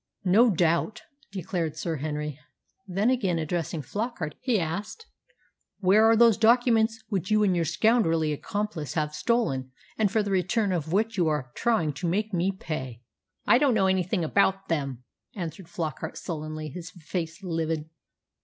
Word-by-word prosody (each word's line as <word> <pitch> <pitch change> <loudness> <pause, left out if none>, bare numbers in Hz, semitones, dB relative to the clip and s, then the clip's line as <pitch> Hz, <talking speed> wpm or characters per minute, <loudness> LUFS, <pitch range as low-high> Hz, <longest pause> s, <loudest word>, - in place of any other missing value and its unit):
"No 220 +7 +5
doubt," 170 +2 +1 0.3
declared 175 -5 -3
Sir 165 -1 -2
Henry. 150 0 -4 0.5
Then, 195 +6 +1
again 195 -9 +1
addressing 165 -1 -2
Flockart, 205 - -3
he 240 -6 +1
asked, 200 - -4 0.7
"Where 205 +3 +5
are 225 - +6
those 230 -2 +6
documents 225 -1 +3
which 190 -4 -2
you 215 0 +4
and 190 -3 +3
your 170 -1 +1
scoundrelly 165 -6 +2
accomplice 165 - -4
have 150 -2 -1
stolen, 150 - 0 0.3
and 210 -3 +3
for 220 -1 +2
the 200 - -3
return 195 +3 +1
of 160 -3 -2
which 220 +3 +1
you 175 -3 +3
are 150 -5 -1
trying 195 -11 +1
to 140 +5 -4
make 210 +4 -1
me 180 +2 +1
pay?" 130 -10 -6 0.4
"I 245 - +5
don't 275 -5 +3
know 195 -3 +3
anything 185 -1 +1
about 195 +3 +1
them," 140 -6 -2 0.3
answered 175 -1 -6
Flockart 165 -4 -4
sullenly, 155 -1 -5
his 175 +4 -8
face 170 +1 -5
livid. 160 -3 -2
180 Hz, 155 wpm, -27 LUFS, 155-215 Hz, 0.7 s, are